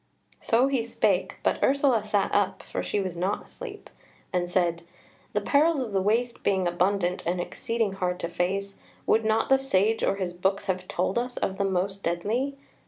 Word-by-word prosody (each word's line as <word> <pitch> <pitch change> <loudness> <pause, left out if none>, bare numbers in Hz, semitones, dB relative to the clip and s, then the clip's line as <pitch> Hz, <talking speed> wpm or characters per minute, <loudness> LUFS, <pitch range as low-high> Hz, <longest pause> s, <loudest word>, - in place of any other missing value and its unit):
So 235 +3 +3
he 270 -4 +1
spake; 235 - 0
but - - +1
Ursula 270 -5 +3
sat 210 -2 0
up 205 -2 +1
(for - - -4
she 205 - -1
was 185 -3 -3
not 185 +4 -1
asleep) 440 -5 -9 0.5
and 175 -1 0
said: 175 -2 +1 0.5
"The - - +1
perils 300 +2 +3
of 245 -5 -3
the 195 -1 +1
waste 235 +4 0
being 190 -2 +2
abundant 180 +1 +1
and 175 +2 -1
exceeding 225 +3 -2
hard 180 -2 -2
to - - -1
face, 195 +3 -2 0.3
would 225 - +3
not 220 +1 +1
the 270 0 +5
Sage 225 -4 +1
or - - +2
his 185 -3 -3
books 190 +3 0
have 185 -2 -2
told 185 +5 0
us 245 +1 -4
of 190 +1 -2
the 200 - +2
most 195 +1 -1
deadly?" 220 +12 -1
200 Hz, 185 wpm, -27 LUFS, 180-235 Hz, 0.5 s, the